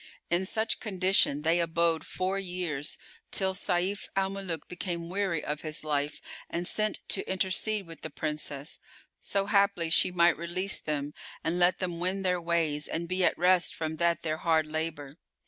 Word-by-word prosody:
In 180 +2 +2
such 220 +2 0
condition 185 - +3
they 165 +2 +3
abode 165 -1 +2
four 185 +1 -1
years 175 -6 -3 0.3
till 190 -1 0
Sayf 185 +1 0
al 195 0 +1
Muluk 190 -5 -4
became 170 -2 -4
weary 190 -5 0
of 150 +1 -3
his 155 -1 -2
life 145 -1 -1 0.3
and 175 +1 -2
sent 215 0 -1
to 195 - +1
intercede 195 +2 +1
with 165 -3 -11
the - - -5
Princess, 150 -1 -4 0.4
so 195 -1 0
haply 200 -5 +2
she - - +6
might 175 -2 +4
release 185 +3 +1
them 150 -1 -3 0.3
and 170 +2 0
let 175 +1 +4
them 175 -3 -3
wend 190 +2 -1
their 180 -1 +1
ways 165 -3 0
and 170 +1 -3
be 185 +1 0
at - - +3
rest 180 0 +3
from 160 -1 -3
that 170 0 +2
their 155 -1 -1
hard 160 -1 +2
labour. 155 -2 -4
170 Hz, 170 wpm, -29 LUFS, 160-190 Hz, 0.4 s, she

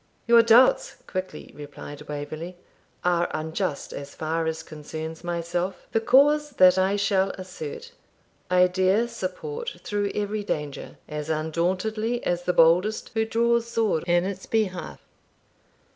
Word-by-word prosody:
'Your 235 -1 +7
doubts,' 235 - +5
quickly 185 -5 -6
replied 145 0 -9
Waverley, 155 +4 -6 0.5
'are 175 -1 +2
unjust 160 0 -3
as 140 0 -8
far 160 +1 -1
as 160 0 -3
concerns 160 +2 -7
myself. 175 +2 -3
The 225 - +2
cause 295 +5 +4
that 185 -6 +6
I 190 +2 +2
shall 200 -1 +2
assert, 180 -5 -7 0.6
I 180 0 +5
dare 190 +5 +2
support 240 - -5
through 205 -1 -1
every 210 0 -2
danger, 150 -8 -4
as 150 0 -5
undauntedly 185 +9 -1
as 175 0 -1
the 180 - +2
boldest 180 +7 +3
who 220 -1 +1
draws 235 +1 +1
sword 220 -8 0
in 175 0 +3
its 190 -1 -5
behalf.' 200 -5 -2
185 Hz, 130 wpm, -25 LUFS, 160-220 Hz, 0.6 s, Your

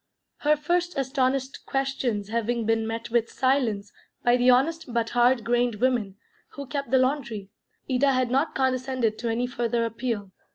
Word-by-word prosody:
Her 300 +1 +3
first 350 +3 -1
astonished 265 0 -1
questions 265 -6 -1
having 235 0 -1
been 225 0 +1
met 230 +1 -5
with 235 -1 +2
silence 240 -7 0 0.3
by 240 0 +4
the 250 0 +3
honest 270 +3 +2
but 230 -1 -1
hard 245 0 +3
grained 240 0 +1
woman 225 -4 0 0.4
who 280 - -7
kept 280 -1 -4
the 260 - +4
laundry, 255 -7 -1 0.4
Ida 275 +1 +3
had 255 -1 +1
not 275 +5 +1
condescended 255 -4 0
to 235 - -2
any 235 +2 0
further 235 -1 -1
appeal. 225 -4 -3
245 Hz, 160 wpm, -26 LUFS, 230-270 Hz, 0.4 s, by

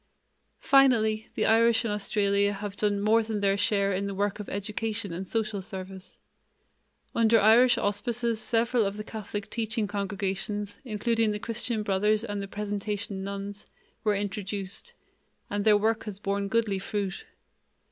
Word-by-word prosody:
Finally, 225 -6 +4
the - - +1
Irish 230 +1 +4
in 220 - 0
Australia 200 -1 +1
have 200 0 -6
done 205 -1 +1
more 215 +3 +4
than 220 -1 -3
their 195 -1 +2
share 200 -1 +1
in 195 +2 -1
the 200 - -4
work 205 +1 -1
of 210 - -6
education 210 0 -3
and 185 +3 -5
social 215 -2 -1
service. 190 0 -9 1.0
Under 225 0 +4
Irish 230 +4 +6
auspices 230 +2 -1
several 235 +1 +2
of 200 0 -2
the 210 - -4
Catholic 210 -2 -6
teaching 225 -1 -1
congregations, 200 0 -3
including 225 -1 +1
the 210 - -1
Christian 230 0 -2
Brothers 210 +2 +2
and 205 -3 -3
the 195 - -5
Presentation 205 0 -4
Nuns, 200 +1 -6 0.4
were 210 -1 +2
introduced, 200 - -4 0.6
and 205 0 -1
their 210 -1 +6
work 220 +2 0
has 210 -3 -5
borne 200 0 -2
goodly 210 -2 +1
fruit. 200 - -3
210 Hz, 150 wpm, -28 LUFS, 200-225 Hz, 1.0 s, Irish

